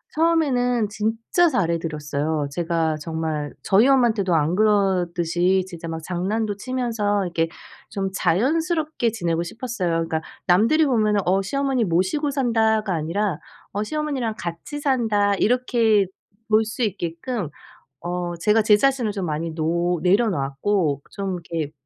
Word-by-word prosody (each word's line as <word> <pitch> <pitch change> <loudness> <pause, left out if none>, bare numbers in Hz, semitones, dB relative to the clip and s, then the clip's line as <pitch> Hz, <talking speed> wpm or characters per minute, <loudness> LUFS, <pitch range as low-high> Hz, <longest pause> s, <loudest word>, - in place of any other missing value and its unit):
처음에는 255 -9 +2
진짜 225 - +1
잘 195 - 0
해 170 - +1
드렸어요. 150 -1 -2
제가 165 -1 0
정말 155 -2 -3
저희 210 +6 +4
엄마한테도 225 -9 +3
안 160 +3 +1
그러듯이 185 -3 +2
진짜 170 -2 -8
막 160 0 -5
장난도 205 +4 -2
치면서 225 -4 -1
이렇게 165 -1 0 0.4
좀 195 -1 -2
자연스럽게 305 - +1
지내고 170 -6 -1
싶었어요. 215 -1 -3
그러니까 165 -1 -1 0.3
남들이 230 - +4
보면은 215 -5 +2
어 190 +2 +3
"시어머니 270 +1 0
모시고 190 - 0
산다."가 220 -6 +1
아니라 165 +3 -1 0.3
어 205 +2 -2
"시어머니랑 275 -4 -2
같이 170 - -5
산다." 220 -8 +2
이렇게 225 -2 +2 0.4
볼 215 +1 +4
수 225 +3 -3
있게끔 185 - -3 0.5
어 175 0 -3
제가 210 +5 +3
제 210 -1 +5
자신을 260 -4 +1
좀 195 -3 -3
많이 160 +2 -3
놓 170 +2 0
내려놓았고 180 - +1
좀 195 -2 -3 0.2
이렇게 160 -3 -2
200 Hz, 315 characters per minute, -23 LUFS, 170-235 Hz, 0.5 s, 제